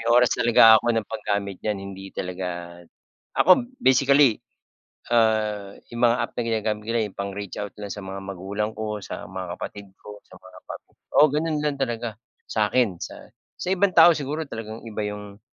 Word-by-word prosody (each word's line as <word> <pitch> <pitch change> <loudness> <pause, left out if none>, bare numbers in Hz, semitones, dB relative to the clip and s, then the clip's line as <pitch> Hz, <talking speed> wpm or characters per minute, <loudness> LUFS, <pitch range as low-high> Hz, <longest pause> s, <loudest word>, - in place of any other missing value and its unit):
May 115 - -7
oras 125 0 +5
talaga 115 -1 +7
ako 120 - -6
ng 110 -2 -1
paggamit 100 -3 -2
niyan 105 -2 -1
hindi 95 +1 -9
talaga 90 -1 -5 0.6
ako 240 +8 +5
basically, 135 -2 +5 0.7
ah, 110 -3 +1 0.2
yung 120 - -5
mga 115 - +3
app - - -5
na 120 - 0
ginagamit 110 -1 -1
nila 115 +1 0
eh, - - -2
yung - - -19
pang-reach 100 0 -5
out 100 -2 -6
lang 100 -1 -6
sa 105 - -8
mga 95 +1 -6
magulang 100 +3 -4
ko, 105 -1 -3
sa - - -7
mga 90 -2 -6
kapatid 100 -1 -7
ko, 105 - -10
sa 95 - -16
mga 95 0 -15
pam - - -7 0.4
oo, 150 - +8
gano'n 155 0 0
lang 150 -1 0
talaga, 120 -3 -2 0.3
sa 105 -2 +1
akin, 120 -8 +2
sa - - -7 0.4
sa - - -5
ibang 195 +1 +2
tao 170 +1 +8
siguro 150 +2 -3
talagang 110 -1 -7
iba 105 -1 -4
yung 105 -1 -8
105 Hz, 185 wpm, -24 LUFS, 100-120 Hz, 0.7 s, oo